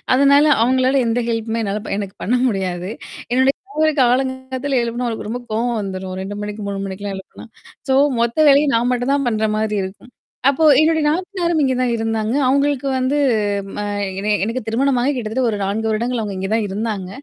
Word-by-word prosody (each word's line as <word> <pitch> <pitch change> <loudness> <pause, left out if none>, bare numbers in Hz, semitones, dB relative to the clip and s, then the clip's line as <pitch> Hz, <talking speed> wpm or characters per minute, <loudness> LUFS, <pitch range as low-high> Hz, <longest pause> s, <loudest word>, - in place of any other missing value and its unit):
அதனால 280 +2 +5 0.2
அவங்களால 260 +2 +2
எந்த 230 +2 +1
ஹெல்ப்மே 225 0 -2
என்னால 205 0 -2 0.2
எனக்கு 195 -2 -6
பண்ண 240 - +1
முடியாது. 185 -3 -2 0.4
என்னுடைய 260 +2 +3
கணவருக்கு 315 -7 0
காலங்கத்தால 260 +1 0
எழுப்பனா 240 +1 -2
அவக்கு 220 - -5
ரொம்ப 245 +2 -4
கோவம் 230 +1 0
வந்துரும் 190 -1 -5
2 200 +2 -5
மணிக்கு, 210 +1 -6
3 200 0 -4
மணிக்கெல்லாம் 195 0 -5
எழுப்பனா. 190 - -12 0.4
சோ 265 - +4 0.3
மொத்த 235 +2 -1
வேலைய 285 +1 +5
நான் 240 +2 +1
மட்டும் 250 +3 0
தான் 275 -3 -1
பண்ற 220 -1 0
மாரி 215 -1 -1
இருக்கும். 190 +6 -9 0.4
அப்போ 280 +3 0 0.2
என்னுடைய 315 0 +3
நாத்தனாரும் 345 0 0
இங்கே 260 -2 +2
தான் 250 -1 +1
இருந்தாங்க. 225 0 -1
அவங்களுக்கு 280 0 +1
வந்து 260 +3 0 0.6
அ - - -2 0.4
என 210 +1 0
எனக்கு 230 +5 -2
திருமணமாக 255 +3 +1
கிட்டத்தட்ட 240 +1 -2
ஒரு 210 - -2
4 215 +3 -1
வருடங்கள் 235 +3 -1
அவுங்க 205 -2 -4
இங்கே 190 +1 -3
தான் 225 -1 +1
இருந்தாங்க. 200 -1 -3
235 Hz, 175 wpm, -19 LUFS, 210-265 Hz, 0.6 s, அதனால